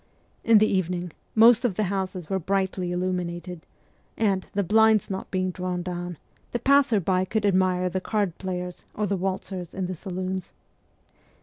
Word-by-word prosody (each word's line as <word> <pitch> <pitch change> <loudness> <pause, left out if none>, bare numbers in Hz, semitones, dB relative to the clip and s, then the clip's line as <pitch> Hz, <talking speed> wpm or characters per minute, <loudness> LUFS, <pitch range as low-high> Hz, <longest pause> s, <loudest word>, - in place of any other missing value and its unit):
In 230 -1 +6
the 215 - +5
evening 180 -3 -1 0.2
most 230 +2 +7
of 230 -7 +1
the 215 - +1
houses 185 -3 -3
were 190 -1 -1
brightly 190 -1 -1
illuminated, 180 -1 -3 0.5
and, 195 -4 +1
the 200 - +1
blinds 220 +1 +4
not 190 - -4
being 185 -1 -1
drawn 180 0 -3
down, 175 -1 -5 0.4
the - - +2
passer 275 -3 +4
by 185 0 +1
could 210 +3 -1
admire 185 -2 +2
the 185 +1 -2
card 200 -4 -1
players 180 -1 -5
or 210 - 0
the 200 0 0
waltzers 185 -1 -4
in 190 -1 -2
the 185 - -3
saloons. 185 +1 -5
185 Hz, 165 wpm, -25 LUFS, 180-200 Hz, 0.5 s, most